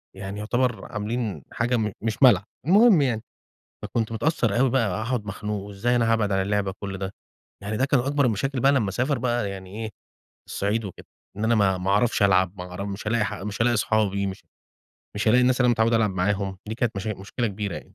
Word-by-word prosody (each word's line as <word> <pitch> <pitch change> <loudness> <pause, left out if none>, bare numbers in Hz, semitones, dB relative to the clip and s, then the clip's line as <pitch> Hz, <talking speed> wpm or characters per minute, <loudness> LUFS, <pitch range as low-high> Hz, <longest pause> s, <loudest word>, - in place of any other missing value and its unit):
يعني 95 +1 -6
يعتبر 120 +3 -1
عاملين 110 0 -3
حاجة 120 +1 0
م 110 -2 -1
مش 110 +4 -1
ملعب. 105 -7 +6 0.2
المهم 205 -1 +6
يعني، 120 -5 0 0.6
فكنت 115 -1 -2
متأثر 115 -4 0
أوي 135 -1 +4
بقى 115 -6 +2
وهاقعد 110 +3 -2
مخنوق 105 0 -4
وإزاي 105 +5 -1
أنا 115 -1 +2
هابعد 105 -3 +1
على 95 0 +2
اللعبة 100 0 0
كل 100 -2 -5
ده، 95 +1 -5 0.5
يعني 105 +2 -3
ده 130 - +2
كان 140 -2 +2
أكبر 140 +3 +1
المشاكل 125 +4 -1
بقى 135 +2 +5
لمّا 125 -8 +1
أسافر 130 +6 0
بقى 120 -4 -1
يعني 95 +3 -7
إيه، 110 - -4 0.6
الصعيد 105 +3 -1
وكده 95 - -10 0.3
إن 105 - -3
أنا 115 +1 +3
ما 95 -3 +3
ما 90 +2 -1
أعرفش 105 +1 +2
ألعب 95 -2 +3
ما 90 - -5
أعر 90 +3 -5
مش 100 +1 -6
هالاقي 105 -3 -1
مش 105 +1 -3
هالاقي 120 +1 +3
أصحابي 100 -2 +1
مش 95 - -7 0.7
مش 105 - -1
هالاقي 120 +3 +5
الناس 125 +1 +3
اللي 125 - +4
أنا 120 - +5
متعوّد 115 0 +2
ألعب 115 -2 +3
معاهم، 95 +1 -1
دي 110 - -3
كانت 115 -2 -1
مشا 105 +3 -3
مشكلة 110 +5 -3
كبيرة 100 -2 -4
يعني. - - -5
110 Hz, 210 wpm, -25 LUFS, 100-120 Hz, 0.7 s, ملعب